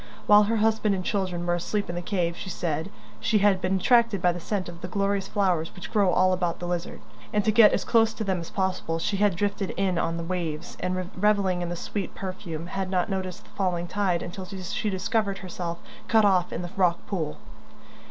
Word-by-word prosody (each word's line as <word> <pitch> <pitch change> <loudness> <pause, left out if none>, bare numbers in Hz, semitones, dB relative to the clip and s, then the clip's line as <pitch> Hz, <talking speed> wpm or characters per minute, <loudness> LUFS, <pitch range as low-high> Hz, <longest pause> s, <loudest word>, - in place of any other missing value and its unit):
While 210 0 +7
her 225 +2 0
husband 220 -1 +2
and 185 -1 -4
children 185 -4 -1
were 175 - +1
asleep 200 +4 -1
in 170 - -4
the 175 - -3
cave, 175 -2 -1
she 190 - -7
said, 165 -1 -2 0.3
she 225 -2 +2
had 200 -2 +3
been 185 +1 +1
attracted 230 +1 +4
by 180 0 +3
the 175 - -5
scent 190 +1 -2
of 175 0 -9
the 180 - -4
glorious 200 +1 0
flowers, 180 -6 0
which 180 - -8
grow 200 -4 +3
all 185 +1 +4
about 175 -2 -1
the 175 - -6
Lizard, 175 0 -3 0.3
and 210 -1 +1
to 215 - +4
get 215 -1 +7
as - - 0
close 225 -1 +4
to 220 - -3
them 190 -3 0
as 165 - -7
possible 185 -4 -1
she 195 +4 -1
had 205 -2 +3
drifted 200 +1 -1
in 185 -3 +1
on 165 0 -1
the 170 - -3
waves, 170 -2 -3
and, 185 0 -2
revelling 195 -2 +2
in 175 - -2
the 175 - -3
sweet 195 +2 -4
perfume, 180 -4 -5
had 190 +1 -3
not 185 +1 0
noticed 185 -2 -3
the - - -21
falling 180 -3 -1
tide 180 -2 0
until 185 +2 -6
she 190 +2 -3
discovered 200 +1 0
herself 175 -2 -5 0.3
cut 220 -2 +5
off 185 -3 +3
in 175 - -3
the 175 - -6
rock 180 -3 +2
pool. 160 -7 -3
185 Hz, 220 wpm, -26 LUFS, 175-200 Hz, 0.3 s, While